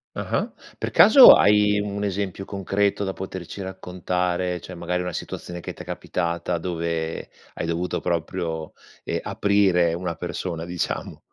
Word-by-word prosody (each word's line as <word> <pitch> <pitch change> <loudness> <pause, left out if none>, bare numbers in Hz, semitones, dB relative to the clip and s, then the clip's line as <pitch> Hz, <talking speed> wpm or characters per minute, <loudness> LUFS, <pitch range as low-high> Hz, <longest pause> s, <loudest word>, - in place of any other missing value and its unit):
Ah-ah. - - -2 0.3
Per - - -4
caso 255 +4 +10
hai 105 0 +4
un 100 0 -3
esempio 95 -1 -3
concreto 100 +1 -1
da 95 -1 -2
poterci 95 0 -7
raccontare, 90 -1 -2
cioè 90 - -9
magari 90 +1 -2
una 90 0 -3
situazione 85 +1 -6
che - - -7
t'è - - -10
capitata, 85 0 -3
dove 85 -1 -3 0.2
hai - - -3
dovuto 85 +2 -2
proprio, 85 -1 -3 0.3
ehm, - - -2
aprire 95 -5 +2
una 90 -1 -3
persona 85 0 -5
diciamo. 90 0 -4
90 Hz, 140 wpm, -24 LUFS, 85-95 Hz, 0.3 s, caso